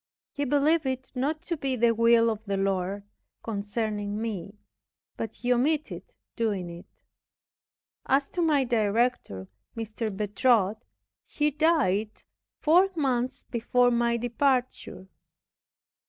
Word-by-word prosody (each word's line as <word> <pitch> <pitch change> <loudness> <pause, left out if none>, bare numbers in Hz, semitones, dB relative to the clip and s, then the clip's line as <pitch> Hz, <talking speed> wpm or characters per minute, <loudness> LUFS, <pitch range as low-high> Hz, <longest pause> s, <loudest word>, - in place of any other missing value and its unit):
He 285 - -3
believed 290 +2 +2
it 260 0 -4
not 295 +5 -2
to 345 - -2
be 270 -4 -2
the 235 -1 +3
will 230 0 +4
of 220 0 -6
the 200 -1 -2
Lord 195 0 -1 0.4
concerning 205 -1 -3
me; 210 -2 -5 0.6
but 225 - -4
he 250 0 +1
omitted 300 +5 0 0.3
doing 200 -7 -2
it. 170 +1 -11 1.2
As 275 +1 +2
to 355 - -3
my 300 -5 +3
director, 220 - 0 0.3
M. 225 - -2 0.3
Bertot, 210 0 +2 0.5
he 300 0 0
died 275 - +2 0.5
four 355 +5 +4
months 255 -5 -1
before 245 +1 +2
my 235 0 +1
departure. 245 -4 -1
235 Hz, 115 wpm, -27 LUFS, 210-275 Hz, 1.2 s, will